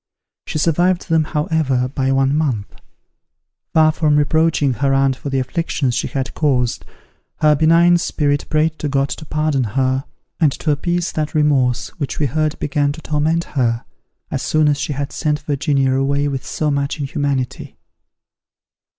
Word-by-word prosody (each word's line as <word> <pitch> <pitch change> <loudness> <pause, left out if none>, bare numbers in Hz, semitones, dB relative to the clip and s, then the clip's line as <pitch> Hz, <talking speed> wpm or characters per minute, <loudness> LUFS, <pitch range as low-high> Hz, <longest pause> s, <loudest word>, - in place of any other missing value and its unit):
She - - -3
survived 175 +4 +1
them 160 -1 +3
however, 150 -5 0
but 135 -2 0
one 135 +1 +2
month. 130 -10 -1 1.0
Far 155 -1 +6
from 155 -1 +1
reproaching 155 -2 +2
her 135 +3 +1
aunt 135 -1 +2
for 140 - -6
the 135 - -1
afflictions 130 0 -1
she 125 - -1
had 135 -1 -3
caused, 125 -6 0 0.6
her 150 -1 +5
benign 170 +3 +4
spirit 145 -3 -1
prayed 155 +1 +1
to 150 - -2
God 140 0 +1
to 155 - -6
pardon 150 -3 0
her, 130 +1 +1 0.3
and 155 -4 +4
to 155 - -1
appease 175 +4 -1
that 155 -1 -3
remorse 135 -5 +2
which 145 - -3
we 150 - +1
heard 155 +3 -1
began 145 0 0
to 160 - -11
torment 155 +3 0
her, 120 -6 -1 0.5
as - - -2
soon 155 -1 +2
as 145 -1 0
she 150 - -2
had 140 +1 -4
sent 150 -1 -1
Virginia 140 -2 0
away 140 +2 +1
with 135 -3 -3
so 150 -1 -2
much 140 +2 -1
inhumanity. 140 -2 -3
145 Hz, 160 wpm, -19 LUFS, 135-155 Hz, 1.0 s, Far